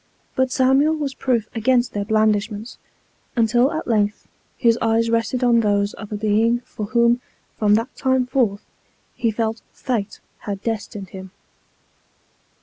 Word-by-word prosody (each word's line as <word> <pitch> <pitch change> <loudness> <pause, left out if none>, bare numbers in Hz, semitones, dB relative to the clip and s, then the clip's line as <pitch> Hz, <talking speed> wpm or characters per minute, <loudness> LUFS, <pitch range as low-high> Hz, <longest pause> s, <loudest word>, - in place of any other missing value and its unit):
But, 260 0 +1
Samuel 270 +5 +3
was 290 -3 -3
proof 240 -5 0
against 240 +2 +1
their 205 -1 -2
blandishments, 215 +1 0 0.6
until 240 +3 +3
at 315 - -4
length 210 -3 0 0.3
his 230 -2 +4
eyes 230 0 +2
rested 230 +2 0
on 240 -1 +4
those 205 -2 +1
of 215 -1 -10
a - - -2
Being 220 +3 +2
for 210 -3 -7
whom, 235 +2 +3 0.4
from 210 -1 +4
that 230 +3 -2
time 260 -1 +1
forth, 240 -6 0 0.5
he 230 - 0
felt 220 0 -2
fate 225 -6 -3 0.2
had 200 -1 -6
destined 210 -3 -4
him. 190 0 -9
230 Hz, 145 wpm, -21 LUFS, 210-245 Hz, 0.6 s, his